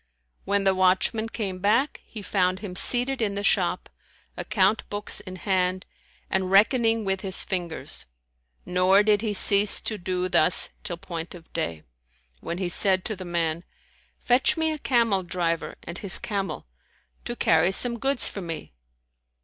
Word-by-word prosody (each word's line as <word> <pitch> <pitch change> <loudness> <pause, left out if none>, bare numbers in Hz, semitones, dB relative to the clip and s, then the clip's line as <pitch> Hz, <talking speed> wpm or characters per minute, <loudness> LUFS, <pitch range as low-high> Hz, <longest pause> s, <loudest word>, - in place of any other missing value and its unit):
When 200 0 0
the 195 -1 +3
watchman 190 +4 +1
came 195 -5 -4
back, 225 +9 0
he 215 -3 -10
found 185 -2 0
him 195 -4 -7
seated 250 +5 0
in 205 -3 -1
the 200 - -4
shop, 180 -3 0 0.5
account 210 +1 +1
books 205 0 -1
inhand, 185 -1 -2 0.4
and 190 -1 -1
reckoning 225 +2 +3
with 190 -1 -1
his 190 -2 -5
fingers; 175 -4 -5 0.6
nor 185 +3 +3
did 210 -1 +2
he 220 -2 -2
cease 200 +1 +7
to 215 -2 -4
do 180 0 -2
thus 175 -1 +3
till 175 - -4
point 170 -2 -7
of 165 -2 -16
day, 80 -2 -4 0.6
when 170 - -6
he 185 -1 -2
said 185 +1 +1
to 215 - -3
the 185 -1 -9
man, 170 -1 -2 0.5
"Fetch 255 +8 +2
me 320 0 0
a 310 - -5
camel 230 -8 +1
driver 170 -2 -3
and 170 +2 -8
his 195 -3 +4
camel, 200 -3 -4 0.6
to 240 - -5
carry 165 -3 +2
some 235 +4 +4
goods 275 +1 0
for 200 - -5
me." 165 - -7
195 Hz, 155 wpm, -24 LUFS, 180-215 Hz, 0.6 s, cease